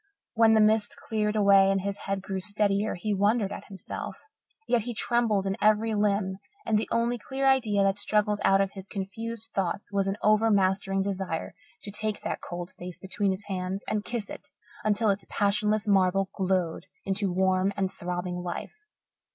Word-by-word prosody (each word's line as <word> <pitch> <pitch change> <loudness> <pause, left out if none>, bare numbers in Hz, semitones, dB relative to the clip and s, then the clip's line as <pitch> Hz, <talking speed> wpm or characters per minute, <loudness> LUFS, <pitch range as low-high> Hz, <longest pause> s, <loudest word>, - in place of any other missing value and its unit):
When 225 -1 +5
the 220 - +5
mist 215 0 +3
cleared 215 -1 -1
away 200 -2 +6
and 195 0 +1
his 200 +1 -3
head 195 -1 -2
grew 195 -1 -3
steadier, 205 +1 0
he 205 +4 -2
wondered 205 +1 +2
at - - -7
himself. 195 -3 -7 0.5
Yet 240 -2 +3
he 240 +2 -5
trembled 220 -4 +1
in 195 0 0
every 215 +1 +3
limb 200 -2 0 0.3
and 220 - +1
the 210 - 0
only 235 +1 +1
clear 270 +4 -2
idea 225 -7 +3
that 195 +1 +1
struggled 210 -1 +1
out 195 0 +5
of 195 -1 0
his 195 -1 -9
confused 225 +3 -5
thoughts 195 +1 -2
was 195 -1 +1
an 195 +1 -1
overmastering 195 -3 +3
desire 190 -4 -3 0.3
to 205 - -6
take 215 +1 -1
that - - -3
cold 175 +1 -6
face 180 0 -7
between 195 +1 -1
his 190 +2 -2
hands 190 0 -3
and 210 -1 -1
kiss 230 -3 -3
it - - -10 0.3
until 215 0 +2
its 195 0 -4
passionless 210 +1 +1
marble 195 -1 +3
glowed 185 -4 -1 0.2
into 195 0 -1
warm 185 +1 +2
and 190 -1 0
throbbing 180 0 -4
life. 175 -1 -5
200 Hz, 175 wpm, -27 LUFS, 190-215 Hz, 0.5 s, away